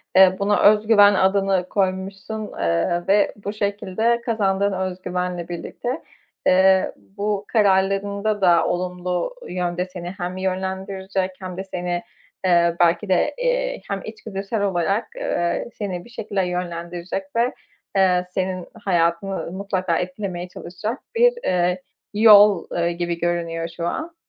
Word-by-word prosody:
eee, 190 0 +7
buna 205 +1 +2
özgüven 210 0 +6
adını 190 -1 +2
koymuşsun, 195 +2 -2
eee, 85 - 0
ve 200 +1 +3
bu 205 - -2
şekilde 210 +3 0
kazandığın 200 -3 +1
özgüvenle 180 -1 -3
birlikte, 240 - -5 0.5
eee, 190 0 +5
bu 205 0 -3
kararlarında 200 0 +1
da 175 -3 +5
olumlu 180 - -2
yönde 180 0 -2
seni 180 -1 -7
hem 180 0 -4
yönlendirecek 190 0 -2
hem 185 -2 -7
de 190 - -3
seni, 175 -2 -3 0.4
eee, 170 -2 +4
belki 175 +4 +3
de, 180 - +2
eee, - - 0
hem 200 -1 -3
içgüdüsel 215 -1 -4
olarak, 195 +2 0
eee, - - -1
seni 185 -4 -4
bir - - -15
şekilde 205 -4 -2
yönlendirecek 175 +1 -4
ve, 235 +2 +2 0.4
eee, 180 -2 +4
senin 185 -1 -2 0.2
hayatını 170 0 0
mutlaka 185 -2 -1
etkilemeye 185 -1 -4
çalışacak 210 +8 -5 0.2
bir, 485 +1 +5
eee, 180 0 +1 0.3
yol, 210 -3 +7
ııı, 170 0 0
gibi 170 0 -3
görünüyor 170 -1 -1
şu 170 - -2
an. 325 - -4
190 Hz, 125 wpm, -22 LUFS, 180-205 Hz, 0.5 s, eee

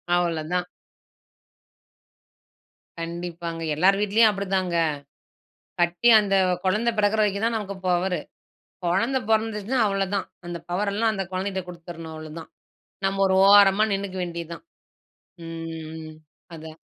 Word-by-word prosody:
அவ்வளதான். 175 0 -1 2.3
கண்டிப்பாங்க. 170 0 -5
எல்லாரு 185 +6 +4
வீட்லயும் 215 +2 +4
அப்படித்தாங்க. 190 -3 -1 1.1
கட்டி 175 +7 +3
அந்த 195 -1 0 0.3
குழந்தை 215 +5 +2
பிறக்கிற 210 +1 +2
வரைக்கும் 205 0 +1
தான் 230 0 0
நமக்கு 200 -2 -5
பவரு. 180 0 +1 0.7
குழந்தை 230 +10 +1
பிறந்துருச்சுனா 220 +2 0
அவ்வளதான். 195 0 -1 0.2
அந்த 175 0 -5
பவரெல்லாம், 205 +4 0
அந்த 195 -1 -2
குழந்தைட்ட 190 0 -2
குடுத்துறணும், 165 -2 -9
அவ்வளதான். 155 +1 -9 0.6
நம்ம 195 0 0
ஒரு 190 0 +2
ஓரமா 200 0 +7
நின்னுக்க 195 -1 -4
வேண்டியது 170 -1 -6
தான். - - -14 0.8
ம். 160 -1 -7 0.4
அதான். 160 0 -10
190 Hz, 105 wpm, -24 LUFS, 170-205 Hz, 2.3 s, ஓரமா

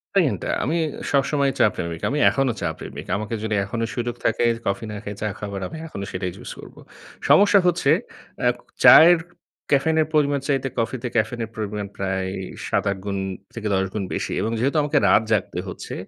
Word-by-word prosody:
Pain 155 - +3
টা - - -3 0.2
আমি 155 +6 0 0.3
সবসময়ই 140 0 +2
চা - - +6
প্রেমিক। 85 -1 -4
আমি 145 +3 -1
এখনো 135 -2 +1
চা - - 0
প্রেমিক। - - -8
আমাকে 105 +2 -4
যদি 110 -1 -1
এখনো 115 +3 -2
সুযোগ 120 -1 -2
থাকে 115 +1 +2 0.2
কফি 100 +4 -1
না - - -6
খায়ে 105 -1 -6
চা 105 - 0
খাবার 100 -1 -5
আমি 160 - -8
এখনো 100 -10 -6
সেটাই 90 -1 -3
চুজ - - -9
করবো। - - -12 0.5
সমস্যা 205 0 +6
হচ্ছে 175 -5 +2 0.5
অ্যা - - +1
ক - - -24 0.2
চায়ের 160 +8 +9 0.5
ক্যাফেইনের 155 +2 +3
পরিমাণ 145 -2 +2
চাইতে 135 -2 0
কফিতে 120 +2 -2
ক্যাফেইনের 115 0 0
পরিমাণ 105 -2 -4
প্রায় 95 -1 -2
এই 95 - -5 0.2
৭-৮ 100 -1 0
গুণ 100 -1 -2 0.4
থেকে 110 -2 -4
১০ 95 0 +1
গুণ 105 - -2
বেশি - - -2
এবং 110 - -1
যেহেতু 140 +6 +1
আমাকে 145 - +1
রাত 105 - +5
জাগতে 95 -4 0
হচ্ছে, 90 - -7
115 Hz, 185 wpm, -23 LUFS, 100-140 Hz, 0.5 s, চায়ের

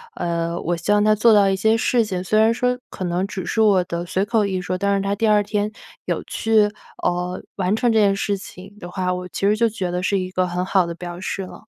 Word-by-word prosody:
呃， 170 0 -2
我 175 - -1
希 170 +5 -2
望 210 0 +4
他 215 0 +4
做 220 +2 +5
到 200 -2 +5
一 195 - +1
些 220 +4 +2
事 235 0 +2
情， 185 -3 -3
虽 215 +4 +2
然 225 +1 +4
说 250 +1 0
可 185 - -7
能 175 +2 -1
只 190 -3 -5
是 225 - -2
我 200 -4 +4
的 170 0 -4
随 190 +3 -1
口 215 -1 +1
一 190 -2 -2
说， 185 0 -3
但 200 +1 +1
是 195 - 0
他 200 0 -1
第 225 +2 0
2 210 -1 +4
天 210 0 -1 0.3
有 - - -2
去， 215 -2 +2 0.3
呃， 180 +1 -1
完 190 +1 0
成 235 +1 +2
这 220 - +3
件 200 -2 +4
事 200 0 -1
情 195 +1 -12
的 175 - -8
话， 180 0 -1
我 180 0 -5
其 - - -7
实 210 - +3
就 230 +1 +3
觉 195 -5 -3
得 180 0 -2
是 200 +1 +1
一 185 0 -4
个 185 0 0
很 180 +1 -2
好 190 -2 +2
的 170 - -4
表 175 0 -7
示 190 +1 -4
了。 - - -11
195 Hz, 280 characters per minute, -21 LUFS, 180-210 Hz, 0.3 s, 做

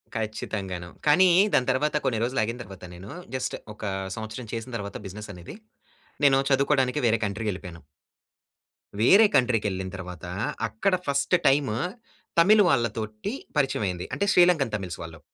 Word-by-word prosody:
ఖచ్చితంగాను. 100 -5 -4 0.2
కానీ 180 +5 +6 0.3
దాని 125 0 +2
తరువాత 150 +4 0
కొన్ని 115 -4 +1
రోజులు 125 0 0
ఆగిన 115 +3 -3
తరువాత 95 -3 -11
నేను, 95 +4 -11 0.3
జస్ట్ 130 - -2 0.2
ఒక 105 - -13 0.3
సంవత్సరం 110 +2 -6
చేసిన 115 +2 -5
తరువాత 100 -1 -6
బిజినెస్ 105 +2 -8
అనేది. 90 - -10 0.7
నేను 135 -1 +5
చదువుకోడానికి 135 -1 +2
వేరే 115 0 +3
కంట్రీకి 105 +2 -2
వెళ్ళిపోయాను... 90 -4 -9 1.2
వేరే 195 - +7
కంట్రీ 125 -2 +3
కెళ్ళిన 95 -2 -2
తర్వాత 90 -2 -8 0.4
అక్కడ 145 - +1
ఫస్ట్ 140 +5 +2
టైమ్ 135 -3 +3 0.7
తమిళ్ 205 +5 +6
వాళ్ళతోటి 110 - -1 0.3
పరిచయం 135 -4 +1
అయింది. 90 -1 -4
అంటే 200 - 0
శ్రీలంకన్ 175 -9 +4
తమిళ్స్ 95 -5 -5
వాళ్ళు. 80 -1 -9
115 Hz, 140 wpm, -26 LUFS, 100-135 Hz, 1.2 s, వేరే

